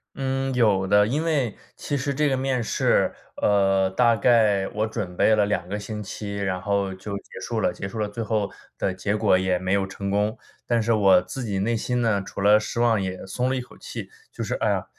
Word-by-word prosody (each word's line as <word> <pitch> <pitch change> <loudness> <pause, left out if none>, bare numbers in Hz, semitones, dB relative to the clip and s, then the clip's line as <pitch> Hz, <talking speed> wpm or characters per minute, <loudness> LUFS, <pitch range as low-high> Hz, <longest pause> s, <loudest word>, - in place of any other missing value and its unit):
嗯， 135 0 -1
有 105 -6 +3
的。 105 +1 +4
因 145 +7 0
为 140 -9 0 0.2
其 145 - -3
实 140 +2 -2
这 150 +1 +1
个 135 - +1
面 130 -2 0
试， - - +2 0.3
呃， 95 -2 +3
大 115 +4 +3
概 105 -4 +3
我 105 +1 -1
准 105 -5 -5
备 110 - +4
了 105 -1 +3
2 90 -4 -1
个 105 +2 -3
星 105 +1 -6
期， 100 +1 -6
然 95 -2 -2
后 100 -1 0
就 100 +1 -6
结 - - -11
束 - - -2
了， - - +1
结 95 - -5
束 110 - -8
了 105 - 0
最 105 +3 -6
后 105 -2 -1 0.3
的 95 - -1
结 100 +3 -1
果 105 -3 +3
也 95 -1 +1
没 95 +1 -1
有 95 -1 +1
成 100 +1 -5
功。 105 +2 0 0.3
但 120 -1 +2
是 115 +1 +1
我 95 -4 +5
自 135 - -6
己 100 -4 -2
内 115 +4 0
心 125 +2 -1
呢 110 -4 +2
除 100 - -7
了 105 +1 +6
失 115 +2 -4
望 115 -3 +3
也 95 -1 -4
松 125 +7 -1
了 130 - 0
一 130 - -2
口 125 - -14
气， - - -7 0.2
就 - - -5
是， - - -3
“哎 - - +2
呀， - - 0
105 Hz, 250 characters per minute, -24 LUFS, 100-120 Hz, 0.3 s, 了